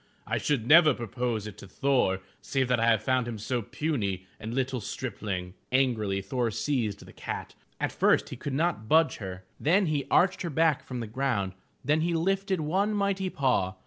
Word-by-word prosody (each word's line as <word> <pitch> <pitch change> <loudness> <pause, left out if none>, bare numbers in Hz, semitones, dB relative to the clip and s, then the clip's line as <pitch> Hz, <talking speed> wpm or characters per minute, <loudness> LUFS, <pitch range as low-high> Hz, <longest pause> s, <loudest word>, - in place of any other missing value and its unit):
I - - -1
should 140 -7 0
never 155 0 +7
propose 120 -1 -2
it 105 -3 -8
to - - -10
Thor 100 -4 +1 0.2
save 135 -2 0
that 125 -2 +3
I 115 - +2
have 110 -2 +3
found 130 -1 +1
him 115 -2 -4
so 120 +4 -2
puny 100 - -2
a 110 - -7
little 130 +1 -1
stripling." 100 -6 -4 0.2
Angrily, 110 -7 +1
Thor 120 +4 -1
seized 115 -2 -2
the - - -14
cat. - - -6 0.3
At - - 0
first - - +3
he - - -6
could 140 - -4
not 155 -8 0
budge 160 +1 +4
her. 95 -2 -7 0.2
Then 185 +7 +3
he 150 -4 -1
arched 185 +1 +3
her 175 - -2
back 160 -1 +2
from 125 -2 -5
the - - -3
ground, 110 -5 -1 0.3
then 150 +3 +3
he 170 +1 +1
lifted 190 +1 0
one 195 +8 +1
mighty 200 -2 0
paw. 125 - +1
130 Hz, 190 wpm, -28 LUFS, 110-155 Hz, 0.3 s, never